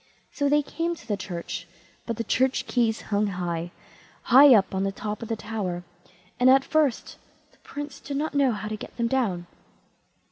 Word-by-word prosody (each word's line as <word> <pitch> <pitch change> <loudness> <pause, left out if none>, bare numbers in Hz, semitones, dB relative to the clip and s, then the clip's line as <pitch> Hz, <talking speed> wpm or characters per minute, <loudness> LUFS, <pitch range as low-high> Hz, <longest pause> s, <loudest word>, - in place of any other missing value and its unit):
So 285 -1 0
they 295 +1 +3
came 335 +4 -2
to - - -15
the 210 - 0
church; 175 -3 -6 0.4
but 230 -2 -3
the 230 - -2
church 260 +4 +1
keys 230 -3 0
hung 205 +1 +2
high, 175 -3 -3 0.5
high 265 +1 +8
up 195 -2 +2
on 190 0 0
the 195 - 0
top 210 +1 -5
of 230 - -5
the 225 - 0
tower, 205 -5 -4 0.6
and 250 +1 +6
at 270 +1 +5
first 305 -5 0 0.3
the - - -29
Prince 290 -1 -8
did 280 -1 -5
not 310 +2 -2
know 280 -3 +3
how 210 -1 -4
to 215 - -3
get - - -10
them 235 - 0
down. 220 -9 0
230 Hz, 190 wpm, -25 LUFS, 195-270 Hz, 0.6 s, high